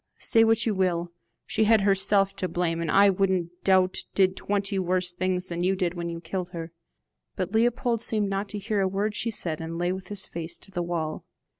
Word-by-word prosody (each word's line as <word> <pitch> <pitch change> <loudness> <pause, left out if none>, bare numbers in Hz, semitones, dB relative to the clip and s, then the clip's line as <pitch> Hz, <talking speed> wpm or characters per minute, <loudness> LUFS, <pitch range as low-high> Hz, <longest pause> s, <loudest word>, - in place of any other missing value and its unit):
Say 225 - +4
what 225 0 +4
you 225 - +1
will, 175 -3 0 0.3
she 220 - +1
had 220 -1 +5
herself 195 0 +3
to 185 - -1
blame, 170 -2 -1
and 165 - -2
I 200 +4 +6
don't 185 -3 0
doubt 185 -1 +3 0.2
did 190 -1 +3
twenty 200 -1 -1
worse 180 -1 0
things 185 0 -1
than 170 0 -3
you 190 +2 +2
did 180 -2 -1
when 170 -1 -4
you 170 0 -5
killed 180 +2 -5
her." 165 -1 -6 0.6
But - - -3
Leopold 235 +1 +1
seemed 215 -3 0
not 195 +1 -2
to 210 - -4
hear 205 0 -1
a 190 - +2
word 200 +3 -1
she 230 - -1
said, 165 -7 -1
and 165 +1 -5
lay 175 +1 0
with 190 -1 -7
his 205 0 -2
face 170 0 -5
to 195 - -18
the 175 - -2
wall. 165 -3 -3
190 Hz, 215 wpm, -26 LUFS, 175-205 Hz, 0.6 s, I